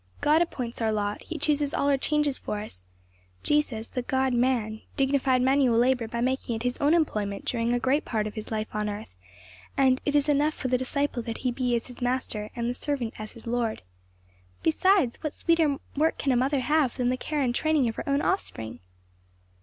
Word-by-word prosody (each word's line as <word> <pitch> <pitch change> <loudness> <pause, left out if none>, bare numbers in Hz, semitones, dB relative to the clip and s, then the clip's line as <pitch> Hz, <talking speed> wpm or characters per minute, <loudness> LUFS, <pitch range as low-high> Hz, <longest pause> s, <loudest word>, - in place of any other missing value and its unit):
God 305 +3 +4
appoints 250 -9 -3
our 220 -1 +2
lot; 205 -1 -1
he 330 - -6
chooses 295 -2 +1
all 280 - +1
our 285 - +4
changes 295 0 +1
for 210 - -3
us; 90 - -8 0.6
Jesus, 270 -7 +1
the 250 - -3
God 265 +1 0
man, 235 -3 +1 0.2
dignified 270 -2 +2
manual 260 -3 +3
labor 245 -1 +2
by 235 +1 -3
making 255 -1 -1
it 225 - -4
his 245 0 -2
own 295 +3 +4
employment 210 -11 -1
during 235 -1 0
a 245 - +2
great 265 +4 +1
part 215 -3 -1
of 210 - -4
his 215 -1 -7
life 215 -1 -2
on 210 0 -1
earth; 205 +1 -6 0.7
and 260 -1 +4
'it 290 - 0
is 290 0 +3
enough 295 +1 +2
for 260 - -3
the 250 - +3
disciple 280 0 -1
that 230 -1 -5
he 250 - +3
be 245 -1 0
as 230 - -2
his 250 0 -12
Master, 245 -4 -1
and 235 -1 -2
the 245 - 0
servant 250 -3 -2
as 215 0 -6
his 230 - -11
Lord.' 230 - -1 0.8
"Besides, 360 - +3
what 305 -2 -3
sweeter 325 -4 +2 0.2
work 315 +3 +2
can 275 - 0
a - - +3
mother 265 +3 +2
have 295 -1 +1
than 250 -1 +1
the 255 - +1
care 295 +3 -2
and 245 -2 +1
training 310 -1 +2
of 225 - -2
her - - -4
own 280 +1 +2
offspring?" 115 - -2
255 Hz, 210 wpm, -27 LUFS, 230-285 Hz, 0.8 s, God